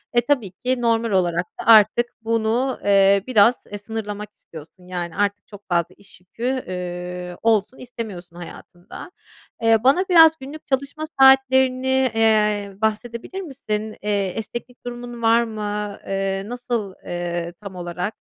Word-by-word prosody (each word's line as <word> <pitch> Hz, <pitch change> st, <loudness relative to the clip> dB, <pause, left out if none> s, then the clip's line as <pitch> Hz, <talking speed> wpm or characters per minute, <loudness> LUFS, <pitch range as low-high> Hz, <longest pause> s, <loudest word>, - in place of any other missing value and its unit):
Eee, 240 Hz, -, +5 dB
tabii 245 Hz, -10 st, +1 dB
ki, 250 Hz, +5 st, -2 dB
normal 230 Hz, -1 st, +1 dB
olarak 175 Hz, -2 st, +1 dB
da -, -, -6 dB
artık 225 Hz, +1 st, +6 dB, 0.2 s
bunu, 230 Hz, +3 st, 0 dB
eee, 195 Hz, -1 st, +4 dB
biraz, 235 Hz, 0 st, +5 dB
e, 205 Hz, -, -7 dB
sınırlamak 210 Hz, -1 st, -6 dB
istiyorsun, 170 Hz, +3 st, -14 dB
yani, 175 Hz, -2 st, -5 dB
artık 205 Hz, 0 st, -1 dB
çok 205 Hz, -1 st, -13 dB
fazla 175 Hz, 0 st, 0 dB
iş 200 Hz, -1 st, -16 dB
yükü, 185 Hz, +6 st, -12 dB, 0.3 s
ııı, 180 Hz, 0 st, -5 dB
olsun 225 Hz, +1 st, +1 dB
istemiyorsun 210 Hz, -8 st, -8 dB
hayatında. 175 Hz, -, -11 dB, 0.5 s
Eee, 225 Hz, 0 st, +5 dB
bana 345 Hz, +9 st, +4 dB
biraz 325 Hz, -3 st, +8 dB
günlük 285 Hz, +4 st, -10 dB
çalışma 280 Hz, +3 st, -2 dB, 0.2 s
saatlerini, 265 Hz, -1 st, +4 dB
eee, 210 Hz, -2 st, +2 dB
bahsedebilir 235 Hz, -, -3 dB
misin? 220 Hz, -, -4 dB
Eee, 205 Hz, -1 st, 0 dB
esneklik 240 Hz, +6 st, -7 dB
durumun 240 Hz, -1 st, -7 dB
var 230 Hz, +1 st, +4 dB
mı? 210 Hz, -2 st, -4 dB
Eee, 195 Hz, 0 st, -2 dB
nasıl, 240 Hz, -5 st, -3 dB
eee, 175 Hz, -1 st, -4 dB
tam 200 Hz, -2 st, -9 dB
olarak? 180 Hz, +4 st, -4 dB
215 Hz, 140 wpm, -22 LUFS, 195-245 Hz, 0.5 s, biraz